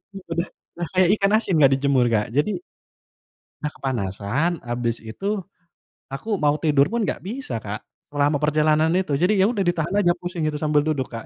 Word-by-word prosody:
Iya 195 - -8
udah 170 +2 -1 0.3
udah 170 - -2
kayak 185 -1 +5
ikan 195 0 +2
asin 215 -4 +1
nggak 135 -2 +6
dijemur, 135 -3 +2
Kak. 110 -1 0
Jadi, 145 - +1 1.1
dah 150 0 -2
kepanasan 125 - -2
abis 120 -1 -2
itu 110 - -8 0.8
aku 195 +10 -3
mau 150 -1 +3
tidur 145 -2 +4
pun 235 -1 -1
nggak - - -2
bisa, 220 - -4
Kak, 105 0 -6 0.2
selama 145 0 +1
perjalanan 155 +1 +3
itu. 185 -4 0
Jadi 185 +5 +3
ya 190 - +4
udah 215 - -4
ditahan 165 -2 0
aja 175 -3 +3
pusing 175 -2 -3
itu 155 - -2
sambil 150 0 +2
duduk, 140 -4 -1
Kak. 115 -2 -6
150 Hz, 180 wpm, -23 LUFS, 130-175 Hz, 1.1 s, nggak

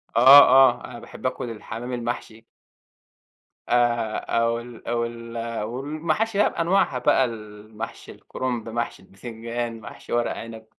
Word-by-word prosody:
آه، 130 +5 +10
آه، 130 -1 +5
أنا - - -9
باحب - - -12
آكُل 120 - -2
الحمام 115 +2 -7
المحشي. 120 -2 -5 1.3
آآ، 120 -2 +1
أو 115 0 0
ال 120 -1 -12
أو 115 0 0
ال 115 0 -8
آآ، 115 -2 -3
والمحاشي 155 - -2
بقى 210 - +4
بأنواعها 165 -6 +1
بقى، 130 - +3
المحشي 105 -2 -8
الكرنب، 120 -3 -5
محشي 115 -4 -4
البِتنجان، 115 +3 -6
محشي - - -9
ورق 120 0 +1
عنب. 115 -1 -9
120 Hz, 135 wpm, -24 LUFS, 115-125 Hz, 1.3 s, آه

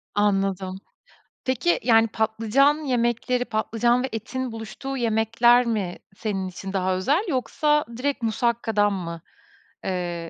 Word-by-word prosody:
Anladım. 195 -2 0 0.7
Peki 260 +7 +1
yani 225 -1 +5
patlıcan 225 +6 +2
yemekleri, 245 0 0
patlıcan 235 +3 +1
ve 265 - -2
etin 250 +3 -4
buluştuğu 225 +5 -6
yemekler 235 +1 +3
mi 205 -6 -2 0.2
senin 195 -3 -3
için 190 +1 -7
daha 185 -1 +1
özel 280 - +1
yoksa 295 +2 +1
direkt 275 -1 -2
musakkadan 225 -2 +1
mı? 170 -3 -5 0.6
Eee 175 -2 -3
225 Hz, 115 wpm, -24 LUFS, 195-250 Hz, 0.7 s, yani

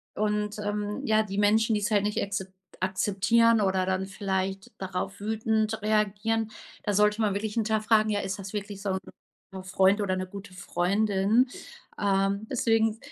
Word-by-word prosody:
und, 210 0 -1
ähm, 205 0 -3
ja, 220 0 +3
die 195 -1 -6
Menschen, 220 +2 +3
die's 210 +1 -1
halt 205 -2 +3
nicht 210 0 0
akzep 195 -1 -3 0.3
akzeptieren 210 +4 +3
oder 190 -1 +1
dann 190 0 -1
vielleicht 195 -1 -3
darauf 190 +1 -4
wütend 220 0 0
reagieren, 215 +1 0 0.3
da 205 - 0
sollte 210 +2 +3
man 205 -2 +2
wirklich 210 +1 -2
hinterfragen: 215 -1 +2
„Ja, 205 - 0
ist 195 +1 -4
das 195 +1 -7
wirklich 205 -1 -5
so 200 - -2
'n 190 - 0 0.5
guter 190 -1 -7
Freund 190 +2 +3
oder 190 -2 0
'ne 185 - -2
gute 195 0 -10
Freundin?“ 200 +6 +1 0.5
Ähm, 200 +1 +1
deswegen, 225 -3 +2
205 Hz, 160 wpm, -27 LUFS, 195-215 Hz, 0.5 s, ja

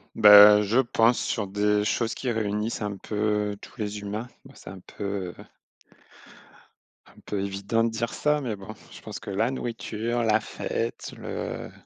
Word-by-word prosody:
Bah, 105 -1 +9
je 110 +5 +2
pense 115 -1 +2
sur 105 - -2
des 105 +1 +1
choses 115 +2 -1
qui 130 - -3
réunissent 110 0 -2
un 105 -1 -3
peu 105 +1 -1
tous - - -13
les 105 -1 -4
humains. 105 +4 -5 0.2
Ben, 135 - -14
c'est - - -11
un 95 -1 -10
peu, 100 -1 -5
heu - - -11 1.6
un - - -21
peu 105 - -2
évident 100 +3 -1
de 115 - +1
dire 115 +1 -3
ça, 150 0 +1
mais 120 -6 -3
bon, 100 +2 -10 0.2
je - - -12
pense - - -8
que - - -8
la 110 +5 0
nourriture, 120 -2 -3
la 110 -1 +3
fête, 115 +1 -4
le - - -6
105 Hz, 170 wpm, -26 LUFS, 100-115 Hz, 1.6 s, Bah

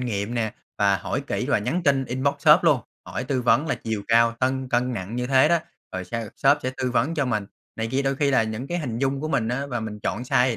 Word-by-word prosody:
nghiệm 115 -2 -2
nè 110 -2 -1 0.3
và 100 -1 +3
hỏi 90 - -3
kỹ - - -2
và - - +3
nhắn 170 +12 -1
tin, 140 -3 +2
inbox 130 +3 0
shop 155 +4 +6
luôn, 150 -6 +4 0.3
hỏi 125 - -4
tư 130 -1 -1
vấn 120 +5 +3
là 160 - 0
chiều 110 -2 -4
cao, 115 0 +4
cân 130 0 0
cân 125 +1 +1
nặng 105 0 -5
như 125 0 -1
thế 135 +2 +5
đó, 170 +1 +4 0.3
rồi 95 0 -4
s 120 - -10 0.2
shop 140 +2 +4
sẽ 130 - -1
tư 130 -1 -1
vấn 130 +6 +1
cho 150 -4 +1
mình 110 -5 -1 0.3
này 110 0 -2
kia, 135 +2 +1
đôi 135 0 0
khi 140 0 +2
là 125 -4 +4
những 110 +4 -4
cái 175 +4 -2
hình 120 -8 -3
dung 135 +1 0
của 155 - -3
mình 125 -7 0
á 135 +3 -2
và 120 -4 -3
mình 105 -1 -6
chọn 105 - -2
size 125 0 +3
thì 115 - -2
125 Hz, 275 wpm, -24 LUFS, 115-135 Hz, 0.3 s, shop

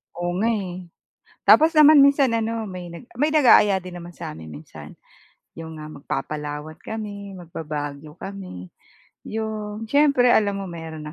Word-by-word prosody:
Oo 175 0 -2
nga 225 - +1
eh. 185 -4 -5 0.6
Tapos 315 +1 +7
naman 305 -1 +8
minsan 275 -3 +4
ano 225 0 -1
may 180 -3 -7 0.2
may 290 +6 +1
nag-aaya 245 -10 +5
din 180 -1 -8
naman 170 - -9
sa - - -7
amin 80 0 -10
minsan 75 +1 -11 0.6
yung 160 -1 -8
nga 155 - -7
mag 140 -2 -12
Papalawan 150 +2 -5
kami, 205 -2 -7
magba-Baguio 150 -2 -7
kami. 185 - -8 0.6
Yung 215 0 -4
siyempre 280 -1 +4
alam 200 -2 +2
mo 195 - -5
meron 165 -3 -8
190 Hz, 145 wpm, -23 LUFS, 155-225 Hz, 0.6 s, naman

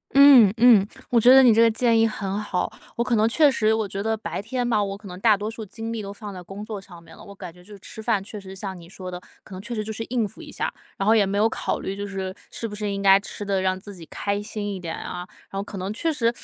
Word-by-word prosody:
嗯 275 -7 +9
嗯， 225 -4 +6 0.2
我 235 -2 +4
觉 245 - +6
得 265 0 +9
你 240 -3 +7
这 225 - +4
个 230 - +6
建 230 +1 +2
议 225 - +4
很 200 -2 -3
好， 180 -4 -2 0.2
我 235 - 0
可 240 -1 +1
能 220 +1 +3
确 295 +4 +4
实 215 -4 +2
我 220 -2 -1
觉 195 0 -5
得 220 +1 -1
白 215 - -5
天 245 +4 -2
吧， 215 -3 +2
我 195 0 -4
可 205 0 -13
能 180 -1 -8
大 215 0 +4
多 210 +2 -4
数 225 0 -7
精 225 +2 -6
力 225 - -3
都 200 -1 -7
放 205 0 -8
在 185 - -8
工 195 +4 -8
作 215 -2 -6
上 175 -3 -13
面 165 -1 -15
了， - - -14
我 200 - -12
感 180 -4 -9
觉 180 +1 -18
就 210 +3 -13
是 - - -15
吃 215 +3 -10
饭 220 -3 0
确 210 0 -8
实 190 0 -10
像 190 0 -6
你 170 -1 -13
说 185 -2 -8
的， 180 0 -7 0.2
可 - - -13
能 185 - -7
确 235 +4 -5
实 215 - -2
就 220 +1 -5
是 225 - -4
应 235 -3 0
付 - - -13
一 - - -10
下， - - -3 0.2
然 195 - -2
后 220 - +5
也 205 -3 +4
没 200 +1 -1
有 215 +2 +4
考 - - -2
虑 195 - -4
就 200 0 -5
是 190 -1 -4 0.2
是 230 - -5
不 210 - -9
是 210 0 -3
应 200 0 -3
该 195 0 +7
吃 205 +1 -7
得 195 -1 0
让 185 0 0
自 205 +1 -10
己 175 -3 -11
开 200 0 -2
心 205 -1 -4
一 190 - -6
点 170 -2 -5
啊， 180 0 -6 0.2
然 195 - -4
后 - - -1
可 200 0 -8
能 190 +2 -3
确 325 +9 -1
实 235 -6 +1
205 Hz, 335 characters per minute, -24 LUFS, 195-225 Hz, 0.2 s, 嗯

